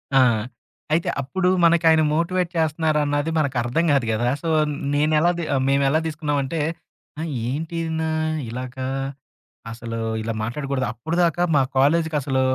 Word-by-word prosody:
ఆ! -, -, +7 dB, 0.7 s
అయితే 165 Hz, -, +1 dB
అప్పుడు 180 Hz, +7 st, 0 dB
మనకాయన 165 Hz, -1 st, +5 dB
మోటివేట్ 175 Hz, +2 st, 0 dB
చేస్తున్నారన్నది 155 Hz, -1 st, +1 dB
మనకు 140 Hz, -4 st, 0 dB
అర్థం 130 Hz, +8 st, 0 dB
కాదు 135 Hz, -4 st, +2 dB
గదా! 120 Hz, +3 st, +1 dB
సో, 165 Hz, -, -2 dB, 0.4 s
నేనెలా 155 Hz, +3 st, +3 dB, 0.4 s
మేమేలా 140 Hz, +2 st, +3 dB
తీసుకున్నామంటే, 150 Hz, -1 st, -2 dB, 0.6 s
ఆ! -, -, -2 dB, 0.3 s
ఏంటినా 160 Hz, +2 st, -2 dB, 0.4 s
ఇలాగా? 130 Hz, +2 st, -5 dB, 0.8 s
అసలు 115 Hz, 0 st, -6 dB, 0.2 s
ఇలా 115 Hz, +1 st, -3 dB
మాట్లాడకూడదు. 135 Hz, +3 st, -2 dB
అప్పటిదాకా 170 Hz, +6 st, 0 dB
మా 135 Hz, -, +5 dB, 0.2 s
కాలేజుకి 160 Hz, +3 st, +3 dB
అసలు 135 Hz, -1 st, 0 dB
150 Hz, 115 wpm, -22 LUFS, 135-165 Hz, 0.8 s, ఆ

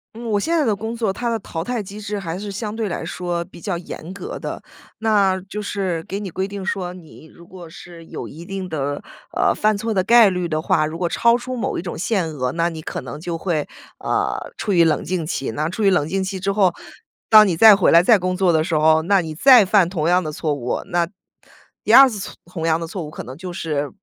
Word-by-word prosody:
嗯， 235 Hz, +1 st, -8 dB
我 205 Hz, -, +2 dB
现 330 Hz, +12 st, 0 dB
在 300 Hz, -, +2 dB
的 215 Hz, -3 st, +1 dB
工 220 Hz, +3 st, -5 dB
作， 220 Hz, -5 st, -1 dB
它 240 Hz, +2 st, -3 dB
的 225 Hz, -1 st, -1 dB
淘 165 Hz, -4 st, -5 dB
汰 240 Hz, +1 st, -2 dB
机 205 Hz, +2 st, -9 dB
制 205 Hz, -1 st, -4 dB
还 170 Hz, -2 st, -5 dB
是 205 Hz, 0 st, -6 dB
相 210 Hz, +2 st, -5 dB
对 220 Hz, -3 st, -2 dB
来 -, -, -4 dB
说 175 Hz, -1 st, -3 dB
比 175 Hz, -2 st, -15 dB
较 185 Hz, -4 st, -2 dB
严 170 Hz, 0 st, -8 dB
格 450 Hz, -, -7 dB
的。 -, -, -6 dB, 0.4 s
那 205 Hz, -4 st, +2 dB
就 210 Hz, +2 st, -5 dB
是 190 Hz, -5 st, -3 dB
给 195 Hz, -, -5 dB
你 200 Hz, -3 st, -5 dB
规 190 Hz, +3 st, -3 dB
定 200 Hz, -1 st, -6 dB
说， 180 Hz, -2 st, -3 dB
你 160 Hz, -3 st, -14 dB
如 170 Hz, 0 st, -16 dB
果 175 Hz, -3 st, -11 dB
是 170 Hz, 0 st, -12 dB
有 -, -, -7 dB
一 165 Hz, +3 st, -10 dB
定 195 Hz, -1 st, -5 dB
的， 145 Hz, -3 st, -3 dB, 0.3 s
呃， -, -, +2 dB
犯 215 Hz, -1 st, +1 dB
错 225 Hz, +1 st, -2 dB
的 185 Hz, -2 st, +1 dB
概 230 Hz, -2 st, +6 dB
率 180 Hz, -2 st, -2 dB
的 155 Hz, 0 st, -1 dB
话， 155 Hz, -1 st, +2 dB
如 160 Hz, +2 st, -5 dB
果 175 Hz, -1 st, -1 dB
超 235 Hz, +6 st, +3 dB
出 255 Hz, +1 st, -6 dB
某 255 Hz, +2 st, -2 dB
一 -, -, -2 dB
种 175 Hz, -, -6 dB
限 185 Hz, -2 st, -1 dB
额， 130 Hz, -4 st, -2 dB
那 170 Hz, +2 st, 0 dB
你 160 Hz, -2 st, -6 dB
可 -, -, -5 dB
能 130 Hz, +4 st, -8 dB
就 170 Hz, -1 st, -4 dB
会， 160 Hz, -4 st, -1 dB, 0.3 s
呃， -, -, -2 dB
处 205 Hz, -, -1 dB
于 170 Hz, -1 st, +5 dB
冷 160 Hz, -, +2 dB
静 175 Hz, -3 st, -2 dB
期。 135 Hz, -6 st, -3 dB
那 155 Hz, +7 st, -2 dB
处 210 Hz, +4 st, -5 dB
于 -, -, +6 dB
冷 175 Hz, -6 st, +2 dB
静 190 Hz, +4 st, -2 dB
期 190 Hz, -1 st, -4 dB
之 195 Hz, +1 st, 0 dB
后， 195 Hz, -4 st, +3 dB, 0.6 s
当 215 Hz, -1 st, +8 dB
你 175 Hz, -, 0 dB
再 220 Hz, +4 st, +9 dB
回 195 Hz, -, +3 dB
来、 170 Hz, +1 st, +6 dB
再 215 Hz, -1 st, +5 dB
工 185 Hz, 0 st, -1 dB
作 185 Hz, -2 st, +2 dB
的 160 Hz, 0 st, +2 dB
时 165 Hz, -4 st, 0 dB
候， 160 Hz, +1 st, +4 dB
那 195 Hz, +1 st, +3 dB
你 160 Hz, -2 st, -6 dB
再 250 Hz, -, +7 dB
犯 190 Hz, -2 st, +3 dB
同 170 Hz, -3 st, -1 dB
样 180 Hz, +1 st, +4 dB
的 155 Hz, -2 st, -5 dB
错 155 Hz, -1 st, -2 dB
误， 125 Hz, -3 st, -3 dB
那 175 Hz, -3 st, 0 dB, 0.8 s
第 -, -, +2 dB
2 270 Hz, -1 st, +9 dB
次 210 Hz, -4 st, -6 dB
错 -, -, -7 dB
同 170 Hz, -2 st, -6 dB
样 160 Hz, -1 st, +2 dB
的 -, -, -3 dB
错 180 Hz, +2 st, -6 dB
误 -, -, -8 dB
可 -, -, -8 dB
能 130 Hz, +4 st, -10 dB
就 180 Hz, 0 st, -7 dB
是 150 Hz, -4 st, -2 dB
185 Hz, 275 characters per minute, -21 LUFS, 165-205 Hz, 0.8 s, 再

